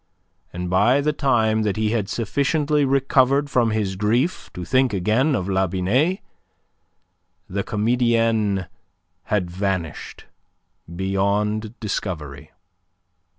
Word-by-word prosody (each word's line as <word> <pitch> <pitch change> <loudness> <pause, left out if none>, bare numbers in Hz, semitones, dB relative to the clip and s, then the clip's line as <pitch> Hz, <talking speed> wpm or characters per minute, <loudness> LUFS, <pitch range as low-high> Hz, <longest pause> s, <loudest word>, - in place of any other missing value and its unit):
And 90 0 -5
by 105 +9 +3
the 150 +1 0
time 110 -7 +1
that 105 -1 -1
he 110 0 0
had 110 -3 -1
sufficiently 145 +5 0
recovered 135 +1 +2
from 120 -3 +2
his 105 -3 -1
grief 115 - 0
to 90 - -5
think 130 0 +2
again 110 - +1
of 95 -5 -2
La 95 -1 +1
Binet, 125 - 0 1.3
the 100 +2 -2
comedienne 115 -3 +1 0.6
had 95 -5 -1
vanished 95 -3 -4 0.7
beyond 105 +4 -1
discovery. 80 - -5
110 Hz, 110 wpm, -22 LUFS, 95-130 Hz, 1.3 s, by